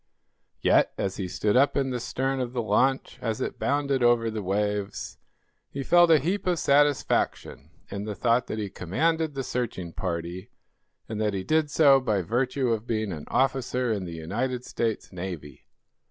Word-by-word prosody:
Yet, - - +3
as 95 -1 -2
he 95 - -3
stood 105 +4 0
up 140 +3 +4
in 135 -1 0
the 125 - -2
stern 135 +3 -2
of 125 -1 -3
the 120 - -1
launch, 130 +6 +1
as 110 -2 -2
it - - -4
bounded 140 -2 0
over 120 -1 +3
the 110 -1 -4
waves, 105 +1 -2 0.5
he 140 - -5
felt 175 +3 +5
a 160 - +7
heap 185 +7 -2
of 180 -1 +2
satisfaction 145 - +1 0.2
in 100 +1 -4
the 105 -1 -4
thought 120 +4 +2
that 110 - -4
he 105 -3 -4
commanded 160 - 0
the 135 - -2
searching 110 -9 -3
party, 85 +1 -4 0.6
and 110 -1 -4
that 105 -2 0
he 95 - -3
did 155 +5 +1
so 145 -2 +6
by 105 -7 0
virtue 125 +6 0
of 115 0 -1
being 110 -3 -1
an 75 -4 -6
officer 130 -2 0
in 100 -3 -3
the 85 - -6
United 125 +10 -3
States 115 -2 -2
Navy. 85 -5 -7
120 Hz, 180 wpm, -26 LUFS, 100-135 Hz, 0.6 s, a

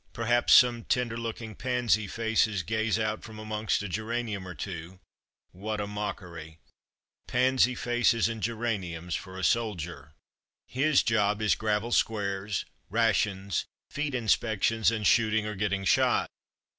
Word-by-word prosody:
Per 115 - -4
haps 120 +1 +4
some 120 -2 +6
tender 125 -2 0
looking 115 -1 -5
pansy 120 -4 0
faces 110 -3 0
gaze 110 +3 0
out 110 -1 -1
from 110 -2 -10
amongst 110 -1 -1
a - - -3
geranium 110 0 -3
or 90 - -7
two 90 +2 -7 0.3
— - - -53
what 105 +4 -4
a 105 - -1
mockery! 90 -6 -6 0.7
Pansy 125 0 +3
faces 120 -2 +2
and 115 -1 -5
geraniums 100 -8 -3
for 95 +2 -5
a 95 - -5
soldier! 85 -8 -1 0.5
His 140 +3 +2
job 105 -2 +1
is 110 -1 +3
gravel 110 +2 -1
squares, 100 -3 0 0.2
rations, 100 -3 +1 0.3
feet 145 -2 -2
inspections, 110 -1 +2
and 110 -2 -2
shooting 110 -1 +3
or 105 - -3
getting 100 -1 -1
shot. - - +2
110 Hz, 140 wpm, -28 LUFS, 100-115 Hz, 0.7 s, some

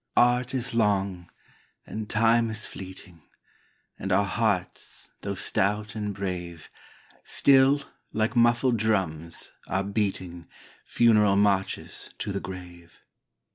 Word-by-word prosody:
Art 125 +1 +3
is 125 -1 -2
long, 100 -5 0 0.6
and 110 -1 -6
Time 115 +1 +3
is 110 -1 -1
fleeting, 90 -3 -10 0.8
And 95 - -3
our 100 +2 +3
hearts, 100 -3 -2
though - - -3
stout 105 +2 0
and 105 -2 -3
brave, 90 -4 -5 0.5
Still, 140 +1 +4 0.3
like 110 +2 0
muffled 120 +1 +3
drums, 90 -7 -1 0.2
are 95 +2 0
beating 95 -4 -3 0.4
Funeral 105 -4 +4
marches 100 -1 0
to 100 - -4
the 100 - -2
grave. 90 -2 -10
100 Hz, 110 wpm, -26 LUFS, 95-115 Hz, 0.8 s, Still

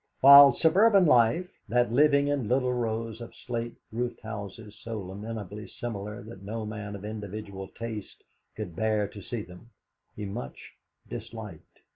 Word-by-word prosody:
While 140 -1 +10
suburban 195 +3 +5
life, 125 +5 +4 0.2
that 120 0 +2
living 140 +2 +4
in 140 -6 -1
little 125 +1 +1
rows 115 -1 -3
of 115 - -9
slate 120 -1 -3 0.2
roofed 120 +2 -3
houses 105 0 -8
so 115 -2 -5
lamentably 105 +2 -7
similar 105 -3 -6
that 105 -3 -11
no 110 +2 -5
man 105 -1 -6
of 100 +1 -8
individual 105 -2 -6
taste 110 -1 -7 0.3
could 100 -6 -6
bear 110 +1 +1
to 100 0 -11
see 115 +1 -5
them, 90 +5 -14 0.5
he 105 - -5
much 80 -10 -6 0.5
disliked. - - -9
110 Hz, 145 wpm, -28 LUFS, 105-120 Hz, 0.5 s, While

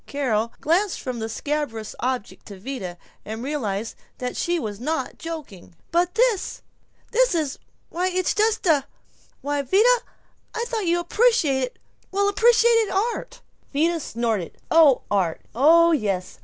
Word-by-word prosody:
Carol 230 -5 -1
glanced 355 +5 +1
from 250 -2 -4
the 220 0 -3
scabrous 245 -4 -3
object 255 -4 -3
to 200 -2 -10
Vida, 195 -6 -6 0.3
and 220 +2 -6
realized 225 -7 -3 0.2
that 250 0 -4
she 345 0 0
was 215 -9 -4
not 315 +6 -3
joking. 295 - -8 0.2
"But 350 +3 +1
this 465 -4 +3
is - - -7 0.5
this - - +3
is 305 -4 -1 0.3
why, 360 +2 -1
it's 370 -1 0
just 435 0 +1
a 295 -6 +3 0.5
Why, 290 0 -1
Vida, 430 - +4 0.6
I 465 - -1
thought 445 -6 -2
you 345 +1 +2
appreciated 340 - +2 0.3
well 400 +1 +1
appreciated 460 +1 +4
art." 460 +5 -2 0.3
Vida 330 +4 +1
snorted, 225 - -2
"Oh. 315 -6 +6
Art. 185 -5 0
Oh 330 +7 +6
yes. 200 - -1
300 Hz, 140 wpm, -23 LUFS, 235-375 Hz, 0.6 s, Oh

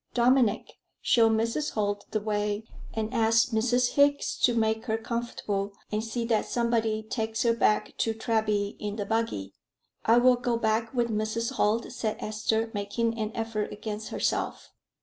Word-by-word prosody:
Dominic, 240 -3 +2 0.2
show 230 -2 +5
Mrs. 230 +7 0
Holt 205 -1 -1
the 215 - -1
way, 210 0 -1 0.3
and 220 +1 -3
ask 225 0 +3
Mrs. 245 +2 +2
Hickes 285 0 +3
to 245 - +4
make 220 -1 +1
her 220 -2 0
comfortable, 220 -4 -3 0.2
and 215 +1 -1
see 230 +1 -3
that 225 -2 +1
somebody 225 -2 0
takes 220 0 -2
her 235 -1 +3
back 215 -2 +1
to 225 -1 0
Treby 215 -2 0
in 210 -1 -4
the 205 -2 -3
buggy." 220 - -2 0.5
"I 230 +2 +5
will 250 0 +5
go 240 -1 0
back 225 0 0
with 240 -1 +1
Mrs. 220 +3 -1
Holt," 225 -2 0
said 215 -2 -2
Esther, 220 +1 -1
making 225 +3 -1
an 215 0 -2
effort 225 -2 -2
against 215 0 -5
herself. - - -2
225 Hz, 160 wpm, -28 LUFS, 215-235 Hz, 0.5 s, show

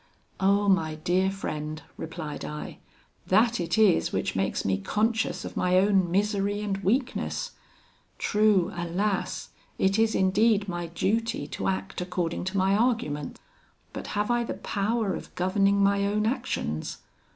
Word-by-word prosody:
'Oh! 200 +1 +3
my 160 -5 +2
dear 180 +4 +1
friend,' 155 -5 -5
replied 160 -2 -6
I; 150 0 -6 0.5
'that 225 +4 +3
it 170 +1 -1
is 215 -5 +4
which - - -1
makes - - -1
me 95 -1 +1
conscious 220 - 0
of - - -7
my 180 0 +2
own 190 -2 +3
misery 205 +2 0
and 200 -2 -1
weakness: 250 - -1 0.7
true, 210 -3 +3
alas! 180 +4 -2 0.3
it 195 +2 +2
is 225 -1 +3
indeed 205 +2 +3
my 175 -2 -3
duty 225 +7 -1
to - - -3
act 190 -1 -2
according 180 -1 -2
to 190 +2 -2
my 190 +1 +3
argument; 210 - 0 0.5
but - - -6
have 210 +3 +1
I 240 0 +2
the - - -4
power 210 0 -1
of - - -8
governing 195 +2 +2
my 200 0 +3
own 210 +1 0
actions? 225 - -2
195 Hz, 145 wpm, -27 LUFS, 175-210 Hz, 0.7 s, is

